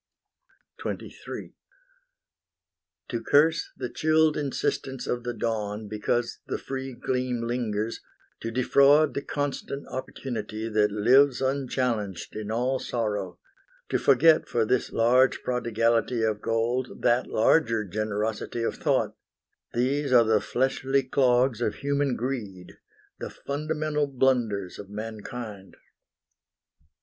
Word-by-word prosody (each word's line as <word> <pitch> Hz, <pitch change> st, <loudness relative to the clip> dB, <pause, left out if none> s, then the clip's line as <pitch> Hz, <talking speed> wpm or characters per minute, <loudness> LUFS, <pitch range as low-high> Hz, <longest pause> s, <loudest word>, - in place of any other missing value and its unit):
XXIII -, -, -6 dB, 1.6 s
To 120 Hz, -2 st, -2 dB
curse 160 Hz, +5 st, +3 dB
the 130 Hz, -, -3 dB
chilled 155 Hz, 0 st, +3 dB
insistence 135 Hz, -2 st, -2 dB
of 120 Hz, -1 st, -2 dB
the 120 Hz, 0 st, -3 dB
dawn 105 Hz, -2 st, -2 dB
Because 110 Hz, +3 st, -1 dB
the -, -, -2 dB
free 135 Hz, -1 st, -5 dB
gleam 125 Hz, -1 st, -2 dB
lingers; 115 Hz, -2 st, -2 dB, 0.4 s
to 115 Hz, -, -4 dB
defraud 140 Hz, +5 st, +4 dB
The 140 Hz, -, -2 dB
constant 145 Hz, -1 st, -3 dB
opportunity 115 Hz, -4 st, -5 dB
that 105 Hz, -2 st, +2 dB
lives 125 Hz, +6 st, +4 dB
Unchallenged 125 Hz, -8 st, -1 dB
in 105 Hz, -1 st, -5 dB
all 125 Hz, +4 st, 0 dB
sorrow; 105 Hz, -6 st, -3 dB, 0.5 s
to -, -, +1 dB
forget 155 Hz, +4 st, +5 dB
For 115 Hz, -2 st, +1 dB
this 125 Hz, +3 st, 0 dB
large 125 Hz, +3 st, +3 dB
prodigality 115 Hz, -1 st, +1 dB
of 110 Hz, -1 st, 0 dB
gold 120 Hz, +3 st, -1 dB
That 120 Hz, +2 st, +3 dB
larger 115 Hz, -2 st, +2 dB
generosity 110 Hz, +3 st, -2 dB
of -, -, -2 dB
thought, -, -, +1 dB, 0.6 s
These 135 Hz, +3 st, +1 dB
are 120 Hz, -2 st, +7 dB
the 110 Hz, -2 st, +3 dB
fleshly 135 Hz, +3 st, 0 dB
clogs 125 Hz, -2 st, +2 dB
of 105 Hz, -3 st, 0 dB
human 140 Hz, -2 st, 0 dB
greed, 110 Hz, -8 st, -5 dB, 0.4 s
The -, -, -5 dB
fundamental 150 Hz, 0 st, -2 dB
blunders 120 Hz, -8 st, 0 dB
of 100 Hz, -, -9 dB
mankind. 110 Hz, -1 st, -7 dB
120 Hz, 115 wpm, -26 LUFS, 110-135 Hz, 1.6 s, are